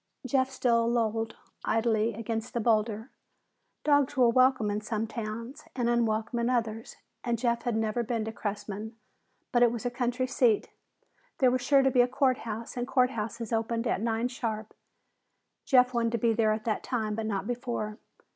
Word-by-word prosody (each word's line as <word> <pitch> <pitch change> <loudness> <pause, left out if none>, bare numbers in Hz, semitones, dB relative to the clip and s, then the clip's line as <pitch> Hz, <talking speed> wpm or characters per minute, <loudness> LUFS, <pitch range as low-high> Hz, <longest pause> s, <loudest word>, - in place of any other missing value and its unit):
Jeff 260 0 +2
still 235 -3 +2
lolled 225 -1 0 0.3
idly 225 -1 +1
against 225 +1 -4
the - - +1
boulder. 220 +1 +1 0.7
Dogs 285 -2 +3
were 245 -2 +6
welcome 255 -4 +3
in 210 +1 -2
some 220 0 -2
towns 230 +3 -6
and 245 -2 0
unwelcome 235 0 +1
in 235 +1 +1
others, 225 -2 -2 0.3
and 240 -1 0
Jeff 235 0 0
had 240 -2 0
never 220 +1 0
been 230 -2 -2
to 220 - -3
Cressman. 210 0 -5 0.6
But 240 - +3
it 240 -1 +6
was 235 0 -5
a 245 - 0
county 245 +1 -1
seat, 245 -4 +2 0.7
there 255 -2 +4
was 255 0 0
sure 275 +2 +4
to 265 - +3
be 250 - +5
a 245 - +3
court 255 0 +1
house, 225 +2 -5
and 245 0 -2
court 255 -1 +3
houses 230 0 -4
opened 230 +1 0
at 210 - 0
nine 230 +1 0
sharp. 220 -4 -4 0.9
Jeff 255 -2 +4
wanted 235 -1 0
to - - +2
be 230 +1 +2
there 220 -1 +2
at 215 0 -2
that 220 -2 0
time 220 -4 -2
but 220 0 -3
not 195 -2 -2
before. 240 -2 -3
230 Hz, 185 wpm, -29 LUFS, 220-245 Hz, 0.9 s, were